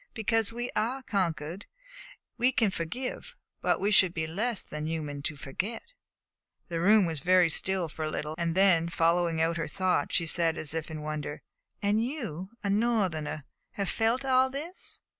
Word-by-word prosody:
"Because 225 -1 +1
we 240 +1 -4
are 245 +5 0
conquered 175 -3 -2 0.7
we 245 +2 +3
can 225 -6 +2
forgive; 250 - -4 0.3
but - - +2
we 200 +2 +1
should 185 -4 +5
be 160 -1 -1
less 205 +7 -1
than 150 0 -5
human 150 -3 -3
to 150 +2 -3
forget." 195 - -5 0.8
The 170 -1 -2
room 205 +3 +6
was 160 -3 -2
very 180 +3 +5
still 190 +1 0
for 155 0 -6
a 155 - -1
little, 150 0 -3
and 170 0 -1
then, 180 -4 +4
following 170 0 +2
out 165 +1 +1
her 165 - -2
thought, 185 -3 0
she 170 - +2
said 165 0 0
as 155 -1 0
if 160 0 -3
in 155 -1 -6
wonder: 150 -1 -4 0.4
"And 210 +2 +3
you, 225 - -4
a 200 - 0
Northerner, 195 -9 0 0.3
have 200 -3 -2
felt 235 +4 +1
all 260 0 +4
this!" 305 +7 -5
180 Hz, 175 wpm, -29 LUFS, 160-225 Hz, 0.8 s, room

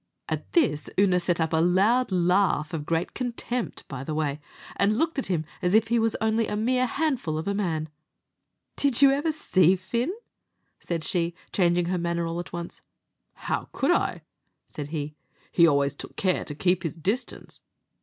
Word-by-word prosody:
At - - -4
this 230 - +2
Oonagh 185 -2 +4
set 170 -1 0
up 160 0 0
a - - +3
loud 195 +9 +3
laugh, 180 -3 +2
of 150 -2 -4
great 165 +1 -1
contempt, 245 -1 -4
by 135 -2 -6
the 155 +2 -4
way, 150 -1 -1 0.3
and 210 +2 +2
looked 320 0 0
at - - -3
him 165 -4 -1 0.2
as 180 +3 +2
if 225 0 +4
he 235 0 +3
was 225 0 +1
only 220 0 +1
a - - -2
mere 250 +4 +1
handful 250 - -1
of 160 - -4
a 200 - +1
man. 165 -6 -1 0.9
"Did 280 -1 +2
you 275 - +8
ever 290 +4 +1
see 190 - +3
Fin?" 235 - -2 0.7
said 165 -2 -3
she, 170 -1 0 0.2
changing 175 -2 +3
her 180 +1 -1
manner 170 0 -1
all 165 +1 -3
at 175 - -7
once. 170 0 -6 0.6
"How - - -2
could - - +1
I?" - - 0 0.4
said 145 -2 -7
he; 150 -1 -4 0.4
"he 170 -1 +6
always 140 -2 +2
took - - -8
care 185 -2 +1
to 150 - -6
keep 180 +3 +1
his 165 -3 -3
distance." 200 - -3
180 Hz, 185 wpm, -26 LUFS, 165-225 Hz, 0.9 s, you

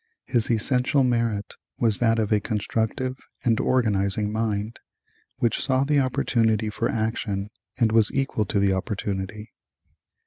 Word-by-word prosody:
His 120 -4 +1
essential 125 +4 +2
merit 115 -4 0 0.2
was 110 -3 +1
that 115 -1 +3
of 110 -1 0
a 105 - +4
constructive 115 +5 -2 0.3
and 115 -2 +3
organizing 105 -4 +1
mind, 110 0 -2 0.6
which 115 -2 +1
saw 130 0 +2
the 145 +1 +2
opportunity 110 -4 +1
for 115 +3 -1
action 110 -2 -2 0.3
and 115 -2 +2
was 110 -1 +4
equal 135 -5 0
to 100 - 0
the 100 -1 +3
opportunity. 100 +1 -4
110 Hz, 135 wpm, -25 LUFS, 105-120 Hz, 0.6 s, a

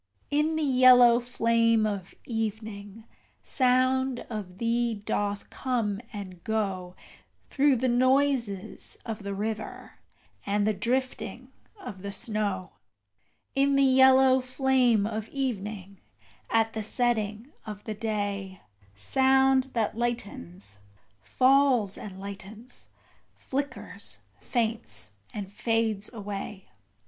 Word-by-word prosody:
In 300 +2 +2
the 315 - 0
yellow 250 -3 +7
flame 230 -2 +2
of 200 -4 -4
evening 220 -2 -5 0.4
sound 255 0 +2
of 195 -5 -6
thee 235 +1 0
doth 205 0 -3
come 230 -6 -1
and 185 -5 -8
go 195 -5 -2 0.6
Through 280 -1 +4
the 255 +2 0
noises 255 -5 +1
of 225 -2 -5
the 200 0 -4
river, 215 +1 -5 0.4
and 205 0 0
the 215 - +2
drifting 250 +2 -2 0.3
of 210 - -8
the 200 +1 -5
snow: 200 -4 -1 0.8
In 275 +1 +3
the 275 - +4
yellow 265 0 +6
flame 255 -4 +2
of 215 0 -4
evening 210 -7 -4 0.5
at 225 0 +2
the 220 - -3
setting 220 +1 0 0.2
of 210 -1 -7
the 220 - -4
day 205 -3 -3 0.4
Sound 265 - +3
that 225 -3 0
lightens, 100 - -4 0.4
falls 255 - +3
and 190 -3 -8
lightens, 200 +4 -9 0.5
flickers, 275 0 -4 0.2
faints 220 - -2 0.2
and 200 -2 -6
fades 220 -1 -1
away. 205 - -7
225 Hz, 105 wpm, -27 LUFS, 200-255 Hz, 0.8 s, yellow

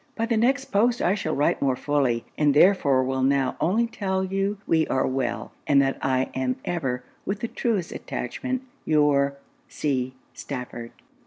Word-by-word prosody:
By 225 - 0
the 230 0 0
next 265 +5 +2
post 235 +4 +3
I 180 - +2
shall 160 -6 -2
write 145 - +1
more 135 -2 +2
fully, 135 -5 0
and 145 -2 +2
therefore 145 -7 +5
will 130 0 -1
now 135 -1 +2
only 215 +8 +2
tell 190 -4 -2
you 195 +2 -1
we 160 -1 +2
are 130 - +1
well, 125 -3 -2 0.2
and 140 -1 +5
that 135 0 -1
I 130 0 +1
am 130 -1 -1
ever, 130 -8 -2 0.2
with 205 +1 -3
the 235 - -1
truest 220 -7 -1
attachment, 260 0 -4 0.2
your 145 -2 +3 0.3
C. 130 - -2 0.2
STAFFORD.' 125 -3 -6
145 Hz, 165 wpm, -25 LUFS, 130-200 Hz, 0.3 s, therefore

